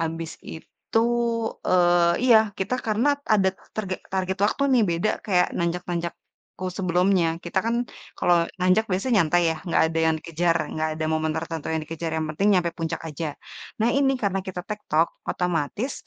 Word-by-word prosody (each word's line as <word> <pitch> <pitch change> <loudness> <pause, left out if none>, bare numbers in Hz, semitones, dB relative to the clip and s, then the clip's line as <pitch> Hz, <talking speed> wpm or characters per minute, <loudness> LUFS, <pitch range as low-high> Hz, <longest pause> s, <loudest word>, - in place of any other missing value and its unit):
abis 165 0 -3 0.2
itu, 160 +6 -4 0.7
eee 175 -1 +4
iya, 240 -3 +7 0.2
kita 195 +6 -1
karena 245 +7 +1
ada 195 -3 +4 0.3
targe 195 -4 -2 0.2
target 190 0 -1
waktu 215 +6 0
nih, 245 -3 +5
beda 170 +6 +1 0.2
kayak 180 -3 +3
nanjak-nanjakku 170 0 -3 0.5
sebelumnya. 180 -1 +2 0.2
Kita 170 +2 -1
kan 230 - +1 0.4
kalau 175 - +4 0.2
nanjak 185 +4 +3
biasanya 205 +7 0
nyantai 175 +2 +3
ya 160 - -6
nggak 170 - +3
ada 165 - -1
yang 160 - +2
dikejar, 170 +1 0 0.2
nggak 155 0 -1
ada 155 - -2
momen 155 0 0
tertentu 165 -1 -4
yang 160 -1 -1
dikejar, 165 +1 -5
yang 160 - -1
penting 195 +6 0
nyampe 170 -1 +1
puncak 165 0 -3
aja. 160 +1 -4 0.5
Nah, 225 - +3
ini 270 -1 +3
karena 195 -2 0
kita 185 -1 -4
tek-tok 170 -6 0 0.2
otomatis 180 - -1
175 Hz, 160 wpm, -24 LUFS, 165-195 Hz, 0.7 s, iya